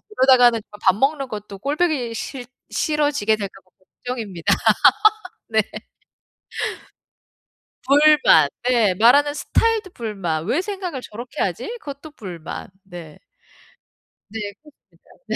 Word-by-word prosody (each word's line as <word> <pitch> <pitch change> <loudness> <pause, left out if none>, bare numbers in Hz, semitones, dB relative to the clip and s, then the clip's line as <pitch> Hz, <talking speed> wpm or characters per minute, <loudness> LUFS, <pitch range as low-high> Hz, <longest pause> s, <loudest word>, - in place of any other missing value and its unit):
그러다가는 245 - +5
아 210 - -11
밥 190 -1 +4
먹는 275 +4 0
것도 210 -3 -8
꼴 280 +8 -2
보기 300 -9 0
싫 245 +2 -6 0.2
싫어지게 290 -8 +1
될까 200 -2 -7
봐 185 - -34 0.4
걱정입니다. 215 -9 -1 1.0
네. 220 0 +3 2.3
불만 290 - +5 0.2
네. 225 -6 +3
말하는 265 +9 +5
스타일도 445 +4 0
불만. 195 - -4
'왜 280 - +1
생각을 375 -8 -5
저렇게 240 +7 -8
하지?' - - -3
그것도 290 +1 -9
불만 180 - -8 0.2
네. 175 -5 -11 1.1
네. 225 - -6 0.2
그렇습니다. 300 -1 -24 0.2
네. - - -2
245 Hz, 240 characters per minute, -21 LUFS, 205-295 Hz, 2.3 s, 그러다가는